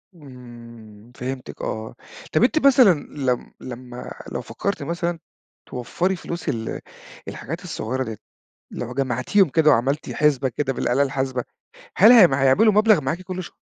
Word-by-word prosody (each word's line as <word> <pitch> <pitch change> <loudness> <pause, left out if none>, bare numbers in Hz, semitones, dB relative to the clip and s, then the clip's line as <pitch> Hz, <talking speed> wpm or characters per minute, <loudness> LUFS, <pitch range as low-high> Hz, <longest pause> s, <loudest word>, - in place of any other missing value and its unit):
إمم 120 -5 -14
فهمتِك 130 +1 -6
آه. 110 +2 -5 0.4
طَب - - +3
أنتِ 290 +3 +2
مثلًا 255 -7 +7 0.2
لم 130 -4 -2
لمَا 125 0 -9 0.2
لو - - -3
فكرتِ 200 0 -4
مثلًا 170 0 -3 0.5
توفري 175 +9 -2
فلوس 170 0 -6
ال 110 -1 -4 0.5
الحاجات 165 +6 -6
الصُغيرة 130 -6 -3
ديّة. 110 -3 -6 0.5
لو 120 +1 -6
جمعتِيهم 135 - +1
كده، 155 +1 +3
وعملتِ 140 +4 0
حسبة 140 -3 +2
كده 135 +2 -2
بالآلة 125 +2 0
الحاسبة، 130 -2 -2 0.5
هل 215 +6 +8
هم 180 - +7
هيعملوا 140 +12 +4
مبلغ 210 -4 +4
معاكِ 155 +7 -3
كل 185 0 -5
ش - - -10
135 Hz, 140 wpm, -22 LUFS, 125-175 Hz, 0.5 s, هل